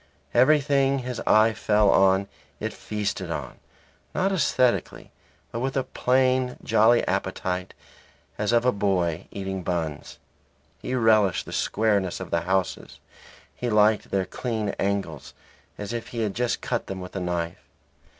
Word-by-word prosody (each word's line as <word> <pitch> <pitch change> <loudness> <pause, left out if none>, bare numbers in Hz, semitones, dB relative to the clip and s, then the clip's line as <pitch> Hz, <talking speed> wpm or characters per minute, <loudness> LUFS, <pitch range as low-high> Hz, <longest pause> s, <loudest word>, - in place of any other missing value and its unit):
Everything 140 +1 +4
his 125 -2 -4
eye 110 +1 +5
fell 105 -1 +3
on 95 +1 +4 0.3
it - - -3
feasted 105 -1 -4
on, - - -5 0.6
not 195 +1 +1
aesthetically, 130 -8 0 0.4
but 115 - -4
with 135 +2 -2
a 135 - +1
plain, 130 0 +1
jolly 115 +2 +4
appetite 90 0 -2 0.6
as 105 +1 -1
of 120 0 +3
a 125 - +5
boy 95 -5 0
eating 95 -1 -4
buns. 80 -4 -4 0.6
He 130 - -3
relished 110 -5 +3
the - - -8
squareness 100 -5 0
of - - -7
the 85 - +1
houses; 95 +1 -2 0.6
he 125 - -3
liked 105 0 +3
their 95 -1 0
clean 110 -3 -3
angles 95 -7 -2 0.4
as 105 +2 -5
if 115 -1 -4
he 115 - -4
had 105 -3 -1
just 120 +2 -1
cut - - -2
them 95 -1 -5
with 90 +1 -9
a - - -1
knife. 85 -1 -3
105 Hz, 145 wpm, -25 LUFS, 95-125 Hz, 0.6 s, eye